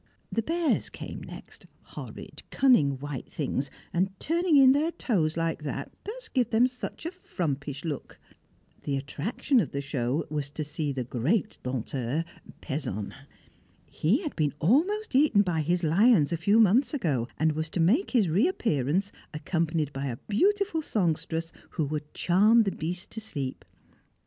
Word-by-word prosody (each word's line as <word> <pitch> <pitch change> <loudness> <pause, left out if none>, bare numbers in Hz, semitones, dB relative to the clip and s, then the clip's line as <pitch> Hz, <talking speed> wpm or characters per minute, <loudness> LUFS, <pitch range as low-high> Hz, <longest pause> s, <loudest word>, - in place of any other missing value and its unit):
The 230 - +1
bears 330 +5 0
came - - -8
next, - - -11 0.2
horrid - - -9
cunning 155 - +4
white 140 -1 -6
things, 140 -2 -2 0.2
and 185 +3 +2
turning 335 0 +2
in 265 -1 +8
their 295 +4 +2
toes 170 - 0
like 165 -1 -1
that 140 -1 -4
does 455 +3 -7
give 250 - 0
them 235 +3 +4
such 250 +5 -7
a 335 - -2
frumpish 145 - -4
look. 150 -5 -5 0.6
The 140 -2 -1
attraction 170 - 0
of 180 - 0
the 140 - -1
show 140 0 -1
was 150 -2 -3
to 155 +2 -4
see 150 0 -2
the 130 -2 -2
great 130 - -1
Dompteur, 130 +4 -2 0.4
Pezon. 135 - -3 0.7
He 215 - +1
had 305 - -4
been 150 -2 0
almost 345 - +2
eaten 260 -7 +5
by 170 -4 0
his 175 +3 0
lions 175 - +4
a 170 - 0
few 200 +7 +3
months 230 +6 +4
ago, 140 - 0
and 160 +1 +3
was 155 +1 -3
to 175 - -4
make 220 - +3
his 230 -7 +3
reappearance 185 - +1 0.2
accompanied 160 -2 -1
by 135 +1 -3
a 120 -3 -3
beautiful 385 - +2
songstress 165 - -1 0.3
who 155 - +2
would 150 +1 -4
charm 210 +6 +5
the 195 - 0
beasts 180 +3 -3
to 225 - -7
sleep. 140 -11 -4
165 Hz, 160 wpm, -28 LUFS, 145-240 Hz, 0.7 s, in